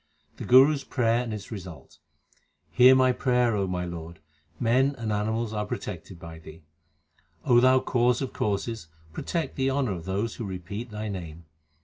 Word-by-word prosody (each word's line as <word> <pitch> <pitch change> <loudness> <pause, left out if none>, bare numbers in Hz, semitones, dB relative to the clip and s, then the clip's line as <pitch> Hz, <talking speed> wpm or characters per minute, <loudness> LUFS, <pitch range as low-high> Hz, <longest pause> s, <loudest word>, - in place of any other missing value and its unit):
The - - -6
Guru 130 +4 +7
s 140 - -4
prayer 120 -2 +1
and 120 -2 -5
its 105 0 -7
result: 90 - -10 0.7
Hear 130 +1 +7
my 130 -1 +4
prayer, 125 -2 +1
O 100 -2 0
my 90 -1 -2
Lord; 85 -1 -8 0.4
men 130 +4 +2
and 110 -3 -3
animals 110 +2 -1
are 105 -1 -2
protected 90 -3 -6
by 80 -1 -10
Thee. 80 0 -13 0.8
O 120 -1 +5
Thou 130 +1 +5
Cause 125 0 +1
of 135 -2 -4
causes, 105 -1 -2 0.3
protect 165 - -3
the 135 0 +1
honour 135 -4 0
of 85 -3 -5
those 100 +4 -2
who - - -5
repeat 100 +4 -6
Thy 105 0 -5
name. 85 -5 -7
110 Hz, 170 wpm, -26 LUFS, 90-125 Hz, 0.8 s, Guru